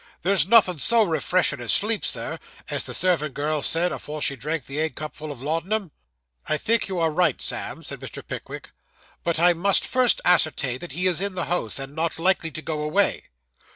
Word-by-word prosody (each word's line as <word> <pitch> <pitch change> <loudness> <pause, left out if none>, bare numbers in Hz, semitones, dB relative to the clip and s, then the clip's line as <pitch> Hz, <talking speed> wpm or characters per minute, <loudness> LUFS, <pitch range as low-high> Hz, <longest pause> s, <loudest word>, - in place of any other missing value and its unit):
There's 190 -1 +3
nothin' 195 -7 +5
so 230 +8 +4
refreshen' 175 -5 +1
as 115 -4 -1
sleep, 210 - +2
sir, - - -3 0.3
as - - -1
the - - -6
servant 160 -6 0
girl 150 +1 -1
said 170 +5 +2
afore 150 +1 -6
she 140 -1 0
drank 150 +1 -3
the 140 +2 -5
egg 160 0 -1
cupful 155 0 -6
of 130 -3 -9
laudanum.' 170 +5 -1 0.6
'I 155 - +1
think 230 +8 +2
you 190 -2 -3
are 165 -2 +2
right, 175 +3 +2
Sam,' - - -2
said - - -7
Mr. - - -8
Pickwick. - - -8 0.5
'But 170 -2 0
I 175 +1 +5
must 190 +4 +2
first 255 -2 +3
ascertain 155 -7 +2
that 175 -3 -7
he 180 +4 -1
is 180 -1 +2
in 200 -1 -1
the 175 -3 -1
house, 150 -8 -1
and 135 0 -6
not 165 0 -1
likely 175 -1 +1
to 155 0 -7
go 155 -2 -3
away. 185 +7 +1
165 Hz, 200 wpm, -24 LUFS, 150-185 Hz, 0.6 s, nothin